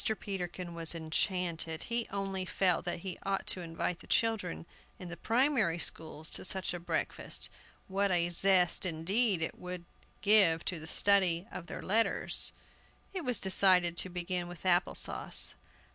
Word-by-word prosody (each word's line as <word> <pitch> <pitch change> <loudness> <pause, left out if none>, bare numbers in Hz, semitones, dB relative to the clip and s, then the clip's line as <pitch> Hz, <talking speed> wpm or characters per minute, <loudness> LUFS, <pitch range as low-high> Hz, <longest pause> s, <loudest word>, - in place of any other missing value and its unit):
Peterkin 180 -2 -5
was 165 0 0
enchanted. 165 0 -2
He 235 -1 -2
only 195 -1 -3
felt 185 -1 +1
that 175 -1 -3
he 185 -2 -6
ought 195 0 -2
to 185 - -2
invite 165 +1 -4
the - - -15
children 215 - 0 0.3
in 180 - -9
the 175 - -6
primary 230 - +1
schools 160 -2 0
to - - -3
such 190 -1 -1
a 175 - -5
breakfast; 170 - -3 0.4
what 200 +1 0
a 175 -2 +1
zest, 180 0 +4
indeed, 185 +3 +1
it - - -3
would 180 -1 -7 0.4
give 185 -5 +4
to 175 - -2
the 155 - -9
study 190 -3 +3
of 170 - -8
their - - -7
letters! 225 +4 +2 0.6
It 375 - -3
was 250 -4 +1
decided 185 -2 +4
to 185 - 0
begin 175 0 -3
with 175 +1 -11
Apple 180 0 +2
sauce. - - 0
180 Hz, 160 wpm, -31 LUFS, 170-195 Hz, 0.6 s, zest